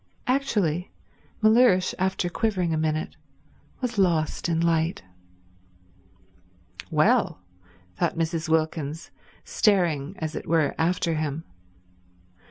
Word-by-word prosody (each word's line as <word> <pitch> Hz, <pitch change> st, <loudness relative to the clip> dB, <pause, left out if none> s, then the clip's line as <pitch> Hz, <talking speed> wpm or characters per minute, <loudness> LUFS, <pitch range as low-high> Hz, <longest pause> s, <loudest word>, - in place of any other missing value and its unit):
Actually 205 Hz, -, 0 dB, 0.5 s
Mellersh, 215 Hz, -4 st, +5 dB
after 190 Hz, 0 st, 0 dB
quivering 180 Hz, -3 st, -1 dB
a -, -, +1 dB
minute, 155 Hz, 0 st, -2 dB, 0.6 s
was 240 Hz, -4 st, -2 dB
lost 170 Hz, -3 st, +1 dB
in 165 Hz, -1 st, +1 dB
light. 165 Hz, 0 st, +1 dB, 1.9 s
"Well," 90 Hz, -, +2 dB, 0.5 s
thought -, -, 0 dB
Mrs. 165 Hz, 0 st, -2 dB
Wilkins, 160 Hz, -1 st, -1 dB, 0.3 s
staring, 175 Hz, -, +1 dB
as 160 Hz, -2 st, -4 dB
it -, -, -6 dB
were, 160 Hz, -3 st, +2 dB
after 170 Hz, 0 st, +1 dB
him. 155 Hz, 0 st, -3 dB
165 Hz, 95 wpm, -25 LUFS, 155-190 Hz, 1.9 s, Mellersh